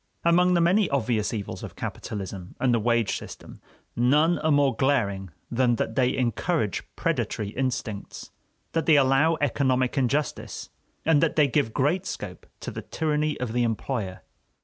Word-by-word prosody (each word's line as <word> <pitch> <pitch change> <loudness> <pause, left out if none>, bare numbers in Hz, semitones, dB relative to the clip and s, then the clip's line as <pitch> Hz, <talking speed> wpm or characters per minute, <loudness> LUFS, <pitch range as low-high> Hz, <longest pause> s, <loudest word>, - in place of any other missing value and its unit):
Among 180 +1 +4
the 170 - +3
many 185 +3 +3
obvious 115 -6 0
evils 105 -4 -5
of - - -8
capitalism 95 -3 -6
and 125 -2 +2
the 115 - +3
wage 115 0 +1
system, - - -11 0.3
none 150 +8 +3
are 155 - 0
more 145 -4 +3
glaring 100 -8 0 0.2
than 120 0 +2
that 110 - -2
they 125 +1 +1
encourage 125 - 0
predatory 105 - -1
instincts, 120 -4 -4 0.4
that 165 - -1
they 160 - +7
allow 140 +4 +4
economic 130 -1 +1
injustice, 140 +4 -2 0.3
and 160 -3 +4
that 165 - +1
they 150 -2 +5
give 135 -3 +1
great 170 - 0
scope - - -7
to - - -5
the - - -6
tyranny 150 -1 -1
of 125 -3 -3
the 120 - +1
employer. 115 -4 -2
130 Hz, 155 wpm, -26 LUFS, 115-150 Hz, 0.4 s, they